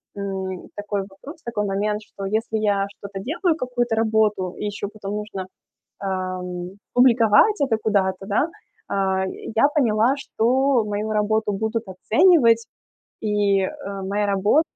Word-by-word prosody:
м, 190 -2 -4
такой 205 -1 -2
вопрос 275 - -12
такой 230 -3 -2
момент, 210 +2 -1
что 200 -1 -8
если 220 +2 -1
я 200 -2 +1
что-то 200 -2 -7
делаю, 320 - 0
какую-то 245 -5 -1
работу, 215 -4 +1
и - - -4
ещё 205 0 -3
потом 205 -1 -6
нужно, 210 -3 -5 0.5
ам, 185 -2 -3 0.2
публиковать 245 - +5
это 255 -5 +2
куда-то, 195 -3 0
да? 210 +10 +1 0.4
А, 190 -1 +1
я 225 +7 +1
поняла, 240 -2 +3
что 260 -1 +2
мою 210 +1 -3
работу 215 0 +1
будут 220 +3 -2
оценивать, 230 - +4 0.5
и, 205 -2 +2
э, 190 - 0 0.4
моя 205 +2 0
рабо 200 +9 +3
210 Hz, 135 wpm, -23 LUFS, 195-230 Hz, 0.5 s, публиковать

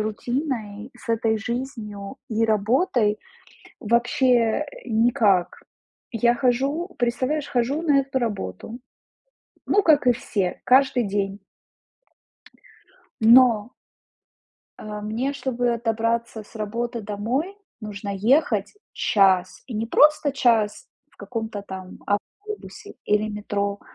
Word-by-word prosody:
рутиной, 220 0 -3
с - - -16
этой 225 -1 +1
жизнью 225 -3 -5
и 225 -1 +1
работой 220 - +1 0.6
вообще, 235 +1 +2
э, - - -8 0.2
никак. 220 -5 +2 0.6
Я 235 +1 +3
хожу 270 +7 0
представляешь, 255 +5 0
хожу 260 +6 -1
на 295 -4 +3
эту 270 -1 -2
работу. 220 - -4 0.9
Ну, 410 - +3
как 310 -7 +4
и 250 - +6
все, 220 -7 -2
каждый 260 -2 +4
день. 200 0 -2 1.8
Но 230 -1 +5 1.1
а, 210 0 -7
мне, 225 +6 -2
чтобы 245 -4 -1
добраться 230 0 -1
с 210 - -20
работы 230 +3 -3
домой, 230 - -3 0.2
нужно 210 -1 -6
ехать 220 0 +2 0.2
час, 185 -3 +2
и 250 - -7
не 220 +2 -2
просто 300 +3 +4
час 225 -6 +1 0.2
в - - -29
каком-то 220 0 -5
там 190 -2 -9
автобусе 405 - -5
или 210 +1 +1
метро. 205 -1 -3
230 Hz, 110 wpm, -23 LUFS, 210-255 Hz, 1.8 s, и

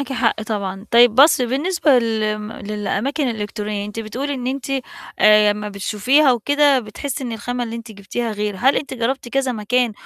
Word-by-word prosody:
معاكِ 270 -1 -4
حق 230 -3 0
طبعًا، 200 -2 -4
طيب 235 -1 +6
بُصي 265 -2 +5
بالنسبة 290 +1 +2
لم 215 -2 -2
للأماكن 215 +7 -2
الإلكترونية، 210 -2 -4
أنتِ 210 +2 -6
بتقولي 260 +6 -4
إن 250 -2 -5
أنتِ 270 +1 -4 0.5
آآ، 210 0 +6
امّا 210 0 -3
بتشوفيها 250 +8 +2
وكده، 285 +3 +3
بتحسي 260 +5 -5
إن 240 - -4
الخامة 245 +3 -3
اللي 230 0 -6
أنت 230 -1 -9
جبتيها 215 +3 -4
غير، 210 -1 -3
هل 265 +6 +3
أنتِ 275 - -3
جربتِ 245 +1 -2
كذا 270 0 0
مكان، 235 +1 0
230 Hz, 175 wpm, -20 LUFS, 210-265 Hz, 0.5 s, طيب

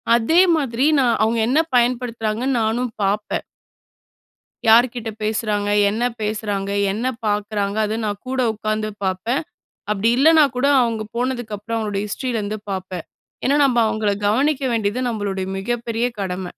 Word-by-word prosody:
அதே 280 +10 +4 0.2
மாதிரி 265 -3 0
நா 260 - +3 0.2
அவங்க 225 +1 +1
என்ன 270 +6 +3 0.2
பயன்படுத்துறாங்கன்னு 240 0 0
நானும் 235 +2 -1
பாப்பேன். 205 +2 -1 1.3
யார்கிட்ட 235 0 +4
பேசுறாங்க? 210 -1 -1 0.2
என்ன 220 +4 -2 0.2
பேசுறாங்க? 210 -2 -2 0.2
என்ன 220 +5 -3 0.2
பார்க்குறாங்க? 205 -1 -1
அது 215 +1 -2
நா - - 0 0.2
கூட 260 0 -1
உட்கார்ந்து 215 0 -2
பாப்பேன். 190 +7 -1 0.5
அப்டி 210 +2 +1
இல்லனா 315 +2 +6
கூட 250 - +1 0.2
அவங்க 230 -2 -1
போனதுகப்புறம் 230 -3 -3
அவங்க 205 -2 -2
ஹிஸ்ட்ரில 240 +3 -3
இருந்து 210 +1 -3
பாப்பேன். 185 -2 -5 0.4
ஏனா, 280 +2 +3
நம்ப 250 -3 +2
அவங்கள 215 -1 0 0.2
கவனிக்க 275 +6 +1
வேண்டியது 220 +1 0
நம்மளுடைய 200 -4 -3
மிகப்பெரிய 235 +2 -2
கடம. 185 -1 -3
220 Hz, 130 wpm, -21 LUFS, 205-245 Hz, 1.3 s, இல்லனா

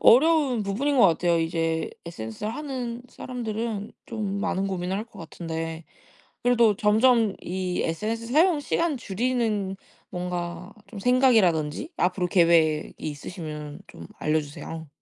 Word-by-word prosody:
어려운 275 -3 +5
부분인 250 +9 0
것 215 - +8
같아요. 170 0 +2
이제 165 0 0 0.2
SNS를 165 - -5
하는 250 -4 -4
사람들은 225 -3 -4
좀 205 -3 -3
많은 195 -2 0
고민을 185 -1 -2
할 210 - -3
것 230 - -17
같은데 165 0 -5 0.6
그래도 235 -3 +4
점점 220 0 +4
이 185 0 -2
SNS 220 +7 -2
사용 315 +6 +4
시간 330 +1 0
줄이는 220 -3 -1 0.3
뭔가 180 0 -4
좀 210 - -9
생각이라든지 220 - +3
앞으로 180 0 +1
계획이 165 -4 +3
있으시면 150 0 -6
좀 80 - -11
알려주세요. 155 +1 -3
195 Hz, 295 characters per minute, -26 LUFS, 165-235 Hz, 0.6 s, 것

